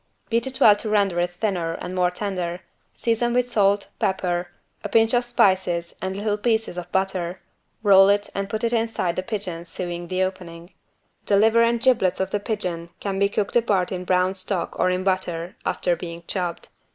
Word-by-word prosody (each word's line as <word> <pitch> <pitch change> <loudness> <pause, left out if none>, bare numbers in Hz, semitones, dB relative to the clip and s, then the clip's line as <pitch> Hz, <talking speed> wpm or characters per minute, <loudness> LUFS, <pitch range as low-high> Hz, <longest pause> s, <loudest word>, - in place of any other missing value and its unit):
Beat 230 +2 +1
it 265 0 -5
well 210 - +7
to 215 - -5
render 200 -4 +2
it 175 0 +1
thinner 175 -3 -2
and 180 +2 -6
more 180 -1 +2
tender, 180 -2 -4 0.3
season 235 +1 0
with 250 0 +1
salt, 200 -2 +2
pepper, 180 -2 0 0.4
a 205 - -4
pinch 225 +2 +4
of 245 0 +3
spices 185 -7 +1
and 190 +1 -3
little 210 0 -1
pieces 220 -3 0
of 180 -1 -7
butter, 190 -2 -1 0.4
roll 195 -1 +7
it 205 0 +2
and 195 0 -3
put 220 +2 -3
inside 225 -6 0
the - - -1
pigeon 185 -5 -5
sewing 175 0 -5
the 185 +1 0
opening. 175 -2 -6 0.5
The 200 - +4
liver 225 +3 +5
and 230 0 +3
giblets 235 -7 +2
of 190 0 -1
the 205 - 0
pigeon 180 -6 -3
can 195 -1 -3
be 200 0 +3
cooked 205 +1 -2
apart 205 -6 +2
in 180 -1 -3
brown 185 +1 +2
stock 185 -1 -3
or 185 - +3
in 185 0 -1
butter, 180 -2 -1
after 175 -1 +1
being 170 -1 -8
chopped. 175 -3 -3
190 Hz, 190 wpm, -23 LUFS, 180-215 Hz, 0.5 s, well